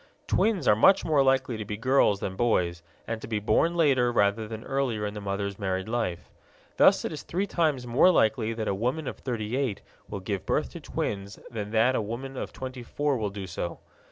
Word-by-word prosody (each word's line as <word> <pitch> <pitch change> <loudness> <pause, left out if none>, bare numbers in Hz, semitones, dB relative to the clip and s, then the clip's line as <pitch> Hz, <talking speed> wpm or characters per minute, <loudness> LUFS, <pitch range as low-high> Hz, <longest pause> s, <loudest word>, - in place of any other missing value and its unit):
Twins 215 -5 +1
are 105 - +6
much 190 - +5
more 150 -3 +3
likely 130 -2 +2
to 110 - -4
be 105 0 -5
girls 115 -4 +3
than 95 - -3
boys, 90 -7 +1 0.2
and 115 -1 -4
to - - -7
be 110 -2 -1
born 165 +11 +2
later 135 -7 +3
rather 105 -1 +1
than 110 0 -7
earlier 130 -6 -1
in 105 - -3
the 105 - -6
mother's 100 0 -3
married 95 -1 -2
life. 115 -7 -2 0.5
Thus - - +5
it - - -2
is 150 - -6
three 185 +4 -2
times 155 -9 0
more 120 +9 +5
likely 110 -8 +2
that 110 -1 -4
a - - +1
woman 125 +9 -2
of - - -5
thirty 115 -2 -3
eight 130 -7 -1 0.3
will 100 - -4
give 95 0 -3
birth - - -1
to - - -8
twins 100 0 -4
than 105 -3 -4
that 115 +4 +3
a - - +1
woman 120 +6 -5
of - - -5
twenty 130 -1 -7
four 145 +4 -1
will 110 -4 -1
do 100 -1 -6
so. 85 -1 -5
115 Hz, 215 wpm, -27 LUFS, 100-135 Hz, 0.5 s, are